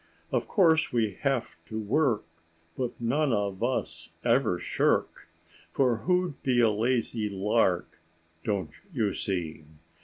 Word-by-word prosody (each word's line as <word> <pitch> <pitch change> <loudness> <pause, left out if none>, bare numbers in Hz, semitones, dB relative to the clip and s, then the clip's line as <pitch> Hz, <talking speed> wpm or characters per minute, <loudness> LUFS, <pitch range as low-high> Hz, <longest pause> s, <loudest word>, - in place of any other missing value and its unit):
Of - - 0
course 165 -6 +4
we 115 -3 +1
have 135 -4 -1
to 110 -1 -4
work, 110 - +1 0.5
But 125 -2 -3
none 135 +5 +1
of 100 -3 -1
us 85 -10 -2
ever 120 -6 +3
shirk; - - 0 0.4
For 125 -4 +2
who'd 180 +3 0
be 125 -2 +2
a 115 -2 +5
lazy 115 -1 0
lark, 95 -2 +1 0.4
Don't 95 -8 -1 0.2
you 105 -4 0
see? 85 -5 -3
115 Hz, 125 wpm, -28 LUFS, 100-130 Hz, 0.5 s, a